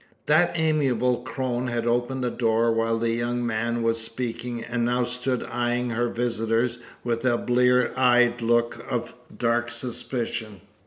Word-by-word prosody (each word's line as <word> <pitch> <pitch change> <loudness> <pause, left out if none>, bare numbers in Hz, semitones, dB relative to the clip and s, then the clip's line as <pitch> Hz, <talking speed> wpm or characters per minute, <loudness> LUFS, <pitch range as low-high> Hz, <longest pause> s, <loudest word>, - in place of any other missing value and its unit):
That 155 +4 +4
amiable 140 -6 +2
crone 125 0 -3
had 120 -1 -2
opened 120 +2 0
the 125 - 0
door 115 -1 +2
while 115 0 +1
the 115 0 0
young 120 +1 -1
man 115 +1 -1
was 115 0 +1
speaking, 120 +1 -4
and 120 0 -2
now 125 +1 +1
stood 125 +1 -2
eyeing 120 0 -1
her 120 +1 0
visitors 115 0 0 0.2
with 115 -1 -1
a 125 -2 +3
blear 125 +1 +3
eyed 120 -1 +4
look 120 0 +1
of - - -2 0.2
dark 120 0 +1
suspicion. 115 -3 -4
120 Hz, 150 wpm, -25 LUFS, 115-125 Hz, 0.2 s, That